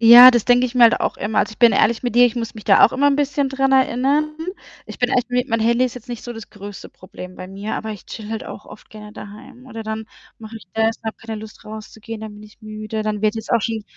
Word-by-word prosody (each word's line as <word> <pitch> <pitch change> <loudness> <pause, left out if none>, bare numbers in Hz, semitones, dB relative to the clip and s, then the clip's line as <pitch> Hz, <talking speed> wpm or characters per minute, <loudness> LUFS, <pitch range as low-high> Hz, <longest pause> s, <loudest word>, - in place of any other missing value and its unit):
Ja, 240 +2 +11
das 240 -3 +1
denke 245 0 +4
ich 250 0 -4
mir 240 - +7
halt 230 - +4
auch - - -1
immer. 215 +2 0
Also, - - -1
ich - - -16
bin 235 -2 +6
ehrlich 225 +4 +2
mit 240 - -2
dir, 245 - +7
ich 245 0 +1
muss 230 -2 -4
mich 215 - -10
da - - +6
auch - - -9
immer 285 +2 +3
'n 280 - +2
bisschen 285 -1 0
dran 270 0 0
erinnern. 270 +4 +2 0.5
Ich - - -11
bin 245 +1 +1
echt 250 0 +1
mi 245 0 0
mein 230 - +1
Handy 235 +3 +2
ist 250 - -3
jetzt 250 0 -12
nicht 240 -2 -6
so 240 - -7
das 225 -2 -11
größte 205 -1 -10
Problem 185 0 -12
bei 185 - -9
mir, 200 +2 -5
aber 220 - -4
ich 205 - -9
chille 215 -1 -8
halt 225 -1 -4
auch - - -9
oft - - -15
gerne 210 -1 -11
daheim. 215 +4 -12
Oder 225 -3 -7
dann 220 0 -5 0.3
mache 220 0 -11
ich 215 - -13
das 225 0 0
habe 220 - -4
keine 225 -1 -7
Lust 220 -1 -12
rauszugehen, 220 +1 -9
dann 215 -1 -8
bin 210 - -13
ich 210 +2 -18
müde. 215 0 -5
Dann 215 -1 -3
wird 215 0 +2
jetzt 220 -1 -7
auch 235 - +3
schon 220 0 -3
225 Hz, 280 wpm, -20 LUFS, 215-245 Hz, 0.5 s, Ja